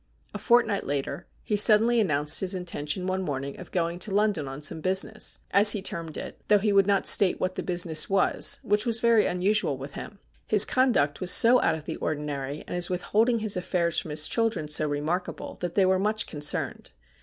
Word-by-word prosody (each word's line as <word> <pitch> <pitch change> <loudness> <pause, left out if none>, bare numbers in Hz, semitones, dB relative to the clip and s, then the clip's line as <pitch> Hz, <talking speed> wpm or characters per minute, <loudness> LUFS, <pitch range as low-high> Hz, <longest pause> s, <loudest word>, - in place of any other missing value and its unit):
A - - -6
fortnight 235 -4 +1
later, 140 0 -5 0.2
he 210 - -2
suddenly 220 +3 +4
announced 150 -6 +1
his 190 0 -2
intention 180 -1 -4
one 185 0 -2
morning 140 -5 -5
of - - -11
going 170 -1 -2
to 210 - -1
London 200 -7 -1
on 135 +1 -8
some 155 +1 -3
business, 190 +5 0
as 205 +1 +6
he 210 - -4
termed 165 -4 -5
it, - - -9
though 210 - +4
he 205 0 -1
would 195 -1 +3
not 200 -1 +1
state 195 -3 +5
what 185 0 -2
the - - -5
business 175 -3 +1
was, 195 -1 +1
which 210 +1 +1
was 230 -2 +1
very 230 -2 +2
unusual 180 -5 0
with 135 +2 -9
him. 210 - -9 0.3
His 210 -1 +6
conduct 225 - 0
was 185 - -1
so 240 +6 +6
out - - +1
of 155 -1 -10
the - - -6
ordinary, 145 -2 -5
and - - -7
his 175 0 0
withholding 220 +6 0
his 215 -2 0
affairs 180 -2 -1
from - - -7
his 150 +1 +1
children 225 -9 -1
so 150 +1 +1
remarkable, 155 +5 -5
that 175 -1 -5
they 195 - +3
were 185 0 +1
much 215 +2 -1
concerned. 150 - -4
185 Hz, 205 wpm, -25 LUFS, 155-210 Hz, 0.3 s, as